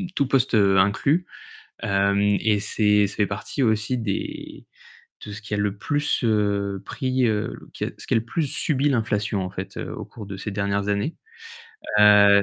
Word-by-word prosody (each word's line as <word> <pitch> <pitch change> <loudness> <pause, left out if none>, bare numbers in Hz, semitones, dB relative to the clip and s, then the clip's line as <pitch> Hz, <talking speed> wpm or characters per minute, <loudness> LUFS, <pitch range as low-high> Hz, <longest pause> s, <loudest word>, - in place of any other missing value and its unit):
tout 140 - +1
poste, 130 -1 +2
heu, 100 -2 +4
inclus. 135 - +2 0.6
Hem, 100 0 +1
et 105 +1 +2
c'est 105 0 +2
ça - - -9
fait 105 - +2
partie 100 +7 -4
aussi 110 +2 +1
des 305 - -5 0.6
de 105 - -7
ce 105 - -7
qui 105 -1 -5
a - - 0
le 105 -1 0
plus, 145 +6 0
heu, 100 -3 0
pris, 130 +2 -1
heu, 105 -2 0
l - - -12
qui - - -4
a - - -2
ce - - -11
qui - - -4
a - - +5
le 110 - -5
plus 140 +8 -2
subi 140 +1 +1
l'inflation, 105 -4 0
en 90 - -3
fait, 95 +1 -7
heu, - - -5
au - - -6
cours 105 -3 -11
de 95 -1 -7
ces 100 +2 -5
dernières 100 0 -1
années, 100 +10 -1 0.8
heu 100 -1 +7
105 Hz, 200 wpm, -23 LUFS, 100-120 Hz, 0.8 s, heu